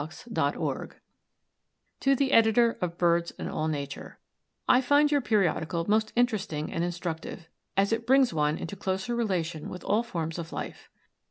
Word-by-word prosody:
To 155 +3 -7 2.0
the 270 0 +1
Editor 230 0 +5
of 175 -1 -2
BIRDS 170 -1 +2
AND - - -5
ALL 155 - -1
NATURE: 140 -2 -5 0.5
I 250 - +5
find 290 +3 +4
your 290 -1 +3
periodical 175 -6 0
most 215 +1 +2
interesting 210 -11 0
and 165 - -1
instructive, 175 -1 -5 0.3
as 200 +3 +3
it 230 0 -2
brings 265 -3 +4
one 150 0 +1
into 185 - -6
closer 190 +4 -2
relation 175 -9 -2
with 180 - -8
all 210 +3 +2
forms 165 -8 -4
of 165 -1 -6
life. - - -7
190 Hz, 150 wpm, -28 LUFS, 165-230 Hz, 2.0 s, Editor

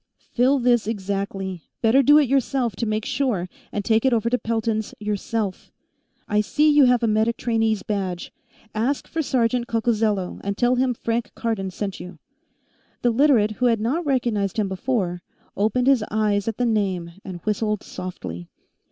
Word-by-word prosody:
"Fill 255 +3 +3
this 240 -3 +2
exactly; 195 -3 -3 0.2
better 235 +5 +5
do 290 +3 +6
it 295 -3 +4
yourself, 255 -4 0
to 230 - -2
make 215 0 -1
sure, 225 -11 -1 0.2
and 205 -1 -3
take 220 -1 +3
it 265 - +3
over 235 0 +1
to 250 - +2
Pelton's 225 -1 -2
yourself. 210 -1 -3 0.6
I 210 0 +2
see 300 +8 +2
you 290 -2 +6
have 245 -1 +3
a - - +3
medic 220 +2 +1
trainee's 225 -3 0
badge. 190 -4 -3 0.4
Ask 245 +6 -1
for 325 - -2
Sergeant 245 -3 0
Coccozello, 220 -4 0
and 200 0 -3
tell 245 0 +3
him 255 -1 +1
Frank 230 +1 -2
Cardon 215 -5 -2
sent 195 +1 -5
you." 180 -1 -9 0.9
The 240 - +4
Literate, 235 -4 +4
who 245 +4 0
had 230 -2 +2
not 260 +11 0
recognized 235 - 0
him 210 -2 +1
before, 190 -2 -2 0.3
opened 220 +5 +1
his 265 -4 +4
eyes 210 -1 0
at 225 - -2
the 245 - +1
name 195 -7 0
and 185 -2 -7
whistled 210 -1 -1
softly. 85 - -7
220 Hz, 170 wpm, -23 LUFS, 200-245 Hz, 0.9 s, do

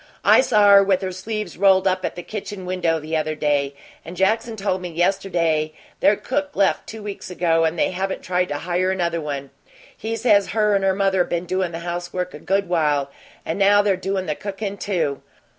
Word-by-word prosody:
I - - +7
saw 210 -5 +4
her 200 0 +8
with 195 -1 +1
her 185 - -2
sleeves 200 -1 -5
rolled 190 -1 +4
up 185 0 0
at - - -3
the 175 - -7
kitchen 205 -2 -6
window 175 -3 0
the 155 +1 -4
other 155 0 -1
day, 145 -2 0 0.3
and 175 +2 -9
Jackson 225 +4 +1
told 195 -3 -2
me 180 - -5
yesterday 170 -3 0 0.3
their 205 - +4
cook 285 +8 -3
left 195 -1 +1
two 220 -1 -8
weeks 205 -2 -7
ago, 165 -2 +2
and 160 +1 -1
they - - +1
haven't 190 +1 -3
tried 180 0 0
to 145 - -3
hire 180 +3 -1
another 170 -3 -1
one. 140 -2 -5 0.4
He 225 +1 -4
says 210 -4 +2
her 210 -1 +3
and 195 -1 +1
her 190 -1 +2
mother 195 -2 +2
been 175 0 -3
doin' 185 -1 -1
the 165 - -5
housework 175 +1 -4
a 150 - -9
good 195 +4 0
while, 150 -5 +1 0.3
and 165 - -3
now 205 +1 +5
they're 200 -2 +2
doin' 190 0 -2
the 155 - -1
cookin,' 200 +3 -5
too. 160 -9 -1
185 Hz, 210 wpm, -22 LUFS, 165-200 Hz, 0.4 s, her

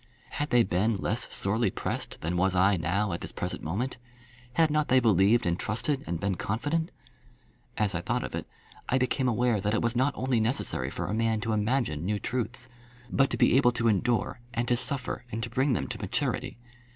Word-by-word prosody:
Had 145 - -2
they 120 -1 +5
been 105 +4 +1
less 95 - -1
sorely 110 +4 +1
pressed - - -4
than 85 +3 -2
was 95 +1 +2
I 95 +2 +4
now 95 +3 0
at 85 - -4
this - - -4
present - - -4
moment? 105 +12 -2 0.6
Had 160 +3 +3
not 150 0 +1
they 130 +1 +5
believed 110 0 +4
and 85 0 0
trusted 130 +6 -1
and 85 -1 -2
been 100 +1 0
confident? 145 - -1 0.9
As 105 -2 +2
I 85 - -1
thought - - -1
of - - -6
it, - - -4 0.4
I 130 - +3
became 130 +1 +1
aware 120 -2 +2
that 105 +2 0
it - - +1
was 120 +1 0
not 130 +3 +2
only 130 -2 +1
necessary 110 - 0
for - - -4
a 100 - -3
man 110 0 +1
to 115 -1 -1
imagine 105 - 0
new 105 +3 0
truths, 125 +3 -3 0.4
but 135 -1 +3
to 120 - -1
be 115 - +4
able 125 -3 +4
to 115 0 0
endure, 120 +4 +1 0.2
and 120 +1 0
to 120 - +4
suffer, 125 0 -2
and 115 +1 -3
to 120 - -5
bring 130 +2 +2
them 75 - -1
to - - -3
maturity. - - -2
115 Hz, 210 wpm, -28 LUFS, 100-125 Hz, 0.9 s, they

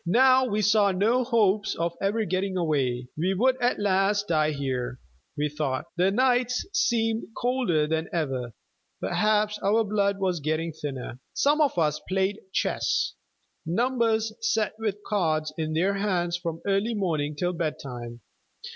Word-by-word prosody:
Now 255 +8 +5
we 215 -3 -1
saw 210 -1 +4
no 220 +7 +2
hopes 215 -4 +2
of 170 0 -1
ever 210 +3 0
getting 185 +1 -1
away. 130 -7 0
We 185 +5 0
would 255 +6 +2
at 245 0 +2
last 200 0 +1
all - - +3
die 155 0 +3
here, 130 -3 -3 0.4
we 150 +1 +1
thought. 145 -3 -2
The 180 +2 +3
nights 250 +2 +2
seemed 225 -1 +1
colder 245 -12 +1
than 160 +1 -2
ever; 135 -8 -2 0.5
perhaps 210 0 +1
our 215 +3 +2
blood 200 -1 0
was 185 -3 0
getting 155 +2 -2
thinner. 135 -5 -6 0.2
Some 295 +2 +3
of 285 -10 +2
us 150 -3 +1
played 190 +2 0
chess; - - 0 0.5
numbers 225 +3 +1
sat 220 -1 +1
with 210 -3 -1
cards 155 -6 0
in 155 -1 -2
their 180 +5 +2
hands 185 -4 0
from 170 -2 -4
early 200 +4 +1
morning 155 -7 -1
till 175 +4 -1
bedtime. 125 -8 -5
190 Hz, 150 wpm, -26 LUFS, 155-215 Hz, 0.5 s, Now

